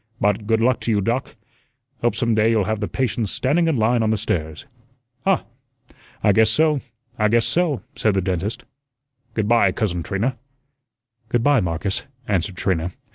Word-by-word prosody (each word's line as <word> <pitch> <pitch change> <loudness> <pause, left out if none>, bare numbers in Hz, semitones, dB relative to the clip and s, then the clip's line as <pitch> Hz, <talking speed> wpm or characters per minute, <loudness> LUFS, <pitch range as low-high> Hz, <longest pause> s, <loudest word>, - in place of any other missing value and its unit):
"But 105 0 +1
good 110 0 +2
luck 125 0 +3
to 120 - -2
you, 105 - +2
Doc. 115 +6 -2 0.7
Hope 120 - +1
some 115 -2 +1
day 110 +1 +3
you'll 110 -3 +3
have 110 +1 -1
the 105 - -2
patients 120 -4 -1
standing 160 +6 +1
in 160 -5 +1
line 115 +2 +2
on 110 - +1
the 110 - +2
stairs." 80 -7 -3 0.6
"Huh! - - +3 0.8
I 105 - +5
guess 110 +2 +4
so, 150 +4 +2 0.4
I 105 - +4
guess 115 +1 +3
so," 150 +1 0
said 105 -3 +1
the - - +3
dentist. 95 +3 -2 0.7
"Good 110 -2 0
by, 115 -4 +4
Cousin 90 -5 -1
Trina." 115 +9 -2 0.9
"Good 120 -1 +1
by, 145 -3 +4
Marcus," 90 +2 -2 0.2
answered 95 -1 -1
Trina. 90 -2 -1
110 Hz, 175 wpm, -22 LUFS, 100-120 Hz, 0.9 s, I